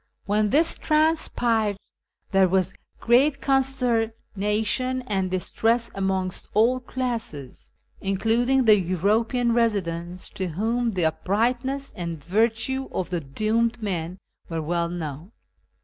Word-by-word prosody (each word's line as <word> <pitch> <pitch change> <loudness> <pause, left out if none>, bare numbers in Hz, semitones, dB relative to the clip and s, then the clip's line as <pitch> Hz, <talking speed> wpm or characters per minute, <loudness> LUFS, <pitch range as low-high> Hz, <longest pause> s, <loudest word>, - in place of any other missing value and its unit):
When 210 +1 +2
this 315 +8 +2
transpired 245 -9 +2 0.5
there 195 -1 +4
was 185 -1 +1 0.3
great 270 +5 +3
consternation 250 -2 0
and 195 -5 -1
distress 225 +6 0
amongst 190 -1 -2
all 235 +4 +4
classes, 235 - -5 0.3
including 230 +7 +1
the 215 -2 +7
European 215 +7 +1
residents, 180 -6 -1
to 190 - -3
whom 225 +7 -1
the 180 -3 0
uprightness 245 - -1
and 170 -2 -4
virtue 225 - 0
of 185 -1 -3
the 175 - 0
doomed 220 - 0
men 180 -3 -3 0.3
were 165 -2 -3
well 170 +1 0
known. 165 - -6
215 Hz, 110 wpm, -24 LUFS, 185-245 Hz, 0.5 s, the